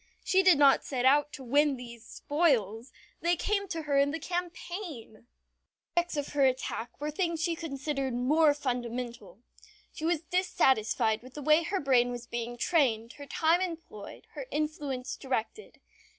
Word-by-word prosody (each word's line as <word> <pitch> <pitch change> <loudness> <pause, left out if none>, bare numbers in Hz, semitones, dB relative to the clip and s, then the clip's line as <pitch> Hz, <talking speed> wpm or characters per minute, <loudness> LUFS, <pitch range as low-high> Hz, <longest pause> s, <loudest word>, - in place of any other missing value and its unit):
She 380 - +3
did 370 -5 +6
not 280 -1 +5
set 255 -2 -2
out 290 +2 +4
to 270 - -8
win 285 +2 +2
these 235 -2 -10
spoils. 255 - 0 0.3
They 345 +2 +2
came 400 +3 -1
to 330 -3 -4
her 285 -2 +2
in 280 0 +3
the 315 - -2
campaign! 350 - -5
The 215 - -20 0.8
objects 345 -2 -7
of 290 - -2
her 290 -1 +1
attack 255 -3 -1
were 300 +1 -3
things 335 0 -1
she 345 -1 +1
considered 275 -4 -3
more 290 +5 +3
fundamental. 240 -5 -4 0.5
She - - -9
was 330 -1 +1
dissatisfied 260 - +1
with 255 +1 -14
the 295 - -6
way 305 +3 +5
her 380 +4 -2
brain 255 -4 +3
was 245 -1 -6
being 240 0 -5
trained, 235 -6 +1
her 285 - -9
time 330 +5 +2
employed, 325 - -7
her - - -7
influence 295 - -3
directed. 265 - -4
285 Hz, 165 wpm, -29 LUFS, 245-325 Hz, 0.8 s, did